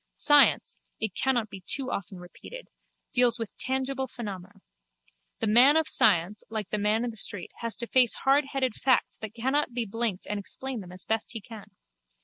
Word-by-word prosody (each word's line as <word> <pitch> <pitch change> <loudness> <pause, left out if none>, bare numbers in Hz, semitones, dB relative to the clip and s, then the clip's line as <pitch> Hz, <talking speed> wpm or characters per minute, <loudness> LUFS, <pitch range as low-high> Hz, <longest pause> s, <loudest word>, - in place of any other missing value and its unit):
Science, 290 -1 +4 0.2
it 220 -4 -3
cannot 240 0 0
be 195 -2 -11
too 265 +7 -1
often 195 -1 -5
repeated, 180 - -12 0.4
deals 245 -2 +3
with 225 -3 -6
tangible 265 0 -1
phenomena. 200 -5 -9 0.8
The - - +3
man 245 +8 +6
of 320 -1 +1
science 180 +5 +2
like 215 -3 -4
the 210 - -1
man 215 +3 +1
in 240 - -3
the - - -14
street 205 -3 +1
has 230 -2 -1
to 235 - -2
face 250 -2 +4
hardheaded 270 -2 +1
facts 260 +3 0
that 220 0 -8
cannot 265 +3 0
be 240 -2 -1
blinked 220 -2 -2
and 210 - -3
explain 260 +5 -5
them 180 -3 -10
as 185 0 -5
best 225 +2 -2
he 225 - -5
can. 215 0 -12
230 Hz, 180 wpm, -27 LUFS, 205-265 Hz, 0.8 s, man